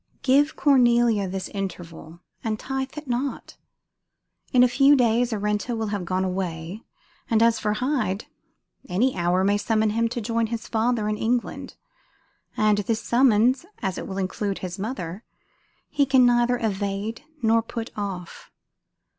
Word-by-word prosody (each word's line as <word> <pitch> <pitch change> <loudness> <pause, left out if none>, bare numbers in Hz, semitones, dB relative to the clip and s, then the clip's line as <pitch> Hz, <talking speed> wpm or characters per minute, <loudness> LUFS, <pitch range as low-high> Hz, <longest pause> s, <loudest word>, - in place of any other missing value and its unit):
Give 285 +3 +3
Cornelia 240 -7 +3
this 185 0 -4
interval, 170 -4 -7 0.2
and 220 -1 -1
tithe 270 +2 -4
it 300 -1 -7
not; 255 +3 -3 0.9
in 250 -2 +6
a - - +6
few 275 +3 +5
days 240 -1 +2
Arenta 210 +2 -1
will 220 -1 -2
have 200 -3 -3
gone 185 +1 -1
away; 180 0 -4 0.5
and 225 -1 +3
as 230 -1 +3
for 210 0 0
Hyde, 220 -5 -1 0.6
any 225 +9 +1
hour 175 +1 +1
may 205 +1 +2
summon 220 0 +1
him 230 +2 +1
to 240 - -3
join 230 0 -1
his 230 0 -5
father 225 -1 0
in 210 0 -1
England; 240 +1 -2 0.8
and 215 -1 +3
this 220 +2 -1
summons, 245 +1 +3 0.2
as 190 -2 -2
it - - -6
will 190 - -5
include 195 +1 -2
his 180 +2 -6
mother, 200 -3 -5 0.6
he 285 -1 +1
can 260 -2 +5
neither 245 0 +3
evade 205 0 -3 0.2
nor 225 +1 +4
put 230 0 -6
off. 190 -4 -6
220 Hz, 150 wpm, -24 LUFS, 195-245 Hz, 0.9 s, in